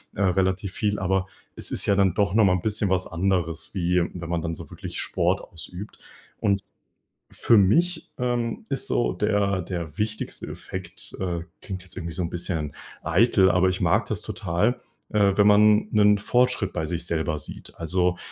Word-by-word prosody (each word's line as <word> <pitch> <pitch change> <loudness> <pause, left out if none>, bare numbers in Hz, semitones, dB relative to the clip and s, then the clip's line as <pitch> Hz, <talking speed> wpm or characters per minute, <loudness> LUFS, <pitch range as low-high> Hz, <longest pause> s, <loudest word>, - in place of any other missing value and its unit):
äh, 100 - -3
relativ 95 +1 +1
viel, 105 -1 -1
aber 95 0 0 0.3
es - - -6
ist - - +1
ja 100 - +3
dann 95 -3 +3
doch 100 -2 +1
noch 110 -1 +5
mal 90 - +4
'n 90 - 0
bisschen 105 -1 0
was 95 -1 +1
anderes, 85 -2 -1
wie 90 -1 +2
wenn 85 -2 -7
man 85 -1 0
dann 85 -1 -3
so - - -10
wirklich - - -6
Sport - - 0
ausübt. 90 +5 -9 0.4
Und 100 -1 +1 0.7
für 115 - +4
mich, 160 - +2
ähm, 120 -2 -1
ist - - -1
so - - +1
der 100 -2 +1
der 85 -4 -5
wichtigste 110 +1 -3
Effekt 95 -2 -7
äh, 90 -2 -1 0.2
klingt 95 -2 -6
jetzt 90 - -13
irgendwie 85 0 -5
so 95 - -2
'n 85 - -2
bisschen 85 -4 -3 0.3
eitel, 95 +2 +4
aber 90 +1 +3
ich 95 +1 -3
mag 95 +6 +3
das 110 -1 -3
total, 105 +2 -1 0.3
äh, 100 -2 +3
wenn 100 0 +6
man 105 +1 +5
'nen 105 -1 +5
Fortschritt 125 -2 +1
bei 80 -3 -2
sich 85 +1 -3
selber 80 -2 -1
sieht. - - -10
Also, 90 +2 0
95 Hz, 185 wpm, -25 LUFS, 85-105 Hz, 0.7 s, wenn